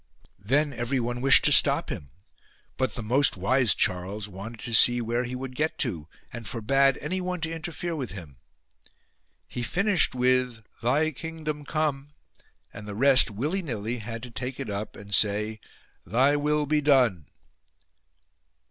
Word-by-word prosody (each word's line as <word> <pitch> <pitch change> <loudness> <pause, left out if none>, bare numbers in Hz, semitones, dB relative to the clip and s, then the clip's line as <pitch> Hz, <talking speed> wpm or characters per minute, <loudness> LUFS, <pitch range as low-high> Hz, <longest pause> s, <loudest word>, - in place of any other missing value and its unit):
Then 140 +8 0
everyone 120 0 -3
wished 135 0 +6
to - - +5
stop - - +4
him; 70 - -7 0.7
but 130 -1 -2
the 115 - -5
most 130 +2 +3
wise 120 +4 +2
Charles 95 +3 -1
wanted 105 +4 -9
to 120 - -5
see 120 +2 +5
where 120 +1 -2
he 125 +1 -5
would 130 0 -7
get 155 +4 -2
to, 85 - -3 0.3
and 115 -3 -6
forbade 135 +5 +1
anyone 180 +3 -3
to 160 0 -3
interfere 165 +1 -5
with 135 -6 -5
him. 80 -10 -11 1.1
He 120 - -6
finished 185 - +1
with 125 -2 0 0.2
Thy 145 +7 +1
Kingdom 155 -1 -6
come 145 -2 -3 0.6
and 105 +1 -10
the 105 - -7
rest, 130 +2 +6
willy 145 - -2
willy, 120 - -4
had 115 +1 -7
to 125 - -9
take 125 +3 -5
it 125 -6 -5
up 100 +1 -5
and 100 0 -10
say 105 +2 +1 0.4
Thy 130 - +2
will 150 +1 0
he 150 +1 +1
done. 125 - +2
125 Hz, 155 wpm, -26 LUFS, 110-145 Hz, 1.1 s, wished